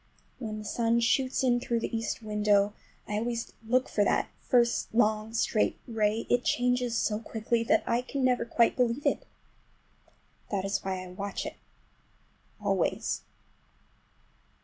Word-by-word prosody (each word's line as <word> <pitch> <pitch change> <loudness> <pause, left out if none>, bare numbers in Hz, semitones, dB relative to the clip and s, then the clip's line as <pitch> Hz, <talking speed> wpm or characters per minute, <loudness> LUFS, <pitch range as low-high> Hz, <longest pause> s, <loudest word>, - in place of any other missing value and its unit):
When 215 -4 -4
the 215 - -7
sun 230 +1 +1
shoots 255 +3 +2
in 245 -2 +3
through 235 -2 -1
the 230 - -3
east 225 0 -3
window—I 210 0 0
always 235 0 -3
watch 255 +2 +2
for 205 - +1
that - - +1
first 240 -2 +2
long, 215 -1 +2
straight 220 -1 +1
ray—it 225 +2 +1
changes 245 -1 +1
so 210 0 0
quickly 230 +1 -1
that - - +3
I 240 +1 +1
never 255 -2 +2
can 235 - -15
quite 235 -1 +4
believe 250 +2 0
it. - - 0 1.2
That 195 -2 -1
is 195 +1 -1
why 190 -1 -3
I - - -9
watch 200 +2 -4
it - - -6 1.0
always. - - 0
230 Hz, 140 wpm, -29 LUFS, 210-245 Hz, 1.2 s, quite